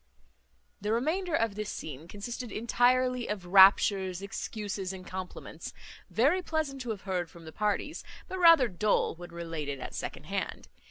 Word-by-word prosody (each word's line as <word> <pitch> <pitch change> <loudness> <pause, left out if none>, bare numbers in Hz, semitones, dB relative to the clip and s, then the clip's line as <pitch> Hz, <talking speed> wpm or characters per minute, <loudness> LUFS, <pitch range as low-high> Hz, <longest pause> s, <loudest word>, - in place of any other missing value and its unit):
The 210 +2 -1
remainder 320 +9 0
of 230 -7 +1
this 210 +1 -4
scene 150 +1 -7
consisted 230 +5 -6
entirely 250 +2 +2
of 200 -4 -4
raptures, 190 0 +6
excuses, 200 -1 -4
and 185 -1 -9
compliments, 185 -1 -7 0.3
very 290 +11 +3
pleasant 310 -5 -2
to 245 - -5
have 210 -3 -3
heard 180 -3 -2
from 170 -2 -14
the 160 - -8
parties; 210 +9 -1 0.2
but 375 - -5
rather 330 -7 +8
dull 210 +2 +1
when 175 +1 -10
related 165 -5 -5
at - - -7
second - - -5
hand. - - -4
210 Hz, 155 wpm, -30 LUFS, 185-250 Hz, 0.3 s, rather